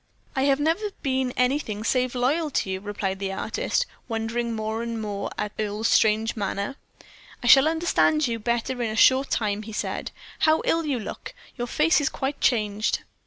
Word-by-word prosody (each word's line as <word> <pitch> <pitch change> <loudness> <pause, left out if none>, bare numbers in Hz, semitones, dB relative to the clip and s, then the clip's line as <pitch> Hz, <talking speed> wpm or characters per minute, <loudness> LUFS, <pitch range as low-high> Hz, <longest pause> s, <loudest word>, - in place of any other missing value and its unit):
"I 265 0 +2
have 275 0 +3
never 330 +8 +1
been 260 -2 0
anything 250 -5 0
save 255 +2 +1
loyal 290 +6 +1
to 195 -8 -1
you," 190 - -2
replied 195 -1 -3
the 195 -1 -2
artist, 220 - -1 0.2
wondering 230 +1 -2
more 220 +1 -2
and 230 -1 -3
more 205 -2 -3
at 210 - -2
Earle's 215 +1 -1
strange 220 +1 +3
manner. 200 +4 -3 0.7
"I - - -4
shall 270 +4 +8
understand 320 -2 +2
you 230 -1 -2
better 235 +2 -1
in 230 - 0
a 215 - -4
short 260 +4 +5
time," 210 -2 0
he 220 0 -9
said. - - -3 0.3
"How 315 0 +3
ill 330 -1 +1
you 270 -4 0
look 215 - -7 0.2
your 240 -2 -3
face 310 +5 +3
is 290 - +1
quite 275 0 -4
changed." 215 -3 +1
235 Hz, 180 wpm, -25 LUFS, 215-275 Hz, 0.7 s, shall